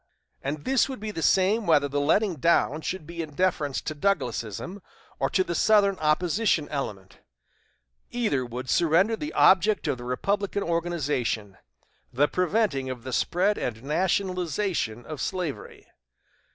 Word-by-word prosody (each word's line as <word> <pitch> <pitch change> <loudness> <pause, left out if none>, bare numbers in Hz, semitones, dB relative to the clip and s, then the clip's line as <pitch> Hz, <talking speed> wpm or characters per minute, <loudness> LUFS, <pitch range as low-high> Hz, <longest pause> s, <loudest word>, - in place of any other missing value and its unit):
And 145 +2 -4
this 265 0 +2
would 265 - -6
be 215 +1 -4
the 165 - -5
same 195 +6 +3
whether 145 -3 +4
the 145 +1 -1
letting 180 +4 +2
down 160 -2 +2
should 175 +1 -4
be 170 +1 -6
in 150 -3 -8
deference 150 -6 0
to 155 - -4
Douglasism, 155 - -2 0.4
or - - +1
to 185 - +2
the 170 - -4
Southern 200 +1 +3
opposition 160 +2 +1
element; 100 -10 -5 0.9
either 215 - 0
would 125 +1 -6
surrender 175 - +3
the 300 +7 -5
object 195 0 +4
of 140 -4 -1
the - - -8
Republican 200 +11 -1
organization 150 - -1 0.6
the 140 +4 +3
preventing 180 -7 0
of 125 -2 -6
the 130 -1 -6
spread 195 +9 +1
and 115 -1 -4
nationalization 180 - -1
of 155 -3 -6
slavery.... 180 -7 -4
165 Hz, 145 wpm, -26 LUFS, 140-195 Hz, 0.9 s, whether